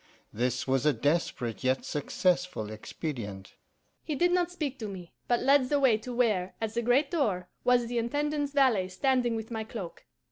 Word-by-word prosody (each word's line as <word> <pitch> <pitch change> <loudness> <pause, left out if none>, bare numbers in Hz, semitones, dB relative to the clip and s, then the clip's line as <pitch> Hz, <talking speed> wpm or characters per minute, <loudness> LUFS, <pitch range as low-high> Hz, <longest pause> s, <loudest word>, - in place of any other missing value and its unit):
This 125 +3 -1
was 135 +2 +1
a 150 - +5
desperate 125 -3 -1
yet 130 +1 +1
successful 175 - 0
expedient.' 110 - -6 0.5
"He 305 - -3
did 350 +5 +3
not 355 -1 +2
speak 300 -7 -4
to 220 - -4
me, 185 -4 -9
but 240 -1 +2
led 270 -2 +4
the 290 - +2
way 260 -5 +5
to 250 +3 -7
where, 215 -7 +1
at 220 -1 -3
the 235 - 0
great 250 +6 +2
door, 205 - 0
was 245 -1 +4
the 240 0 -1
Intendant's 290 +4 -1
valet 255 -10 +3
standing 245 +4 +1
with 220 +1 -5
my 220 -1 -2
cloak. 210 -6 -8
220 Hz, 180 wpm, -29 LUFS, 165-265 Hz, 0.5 s, a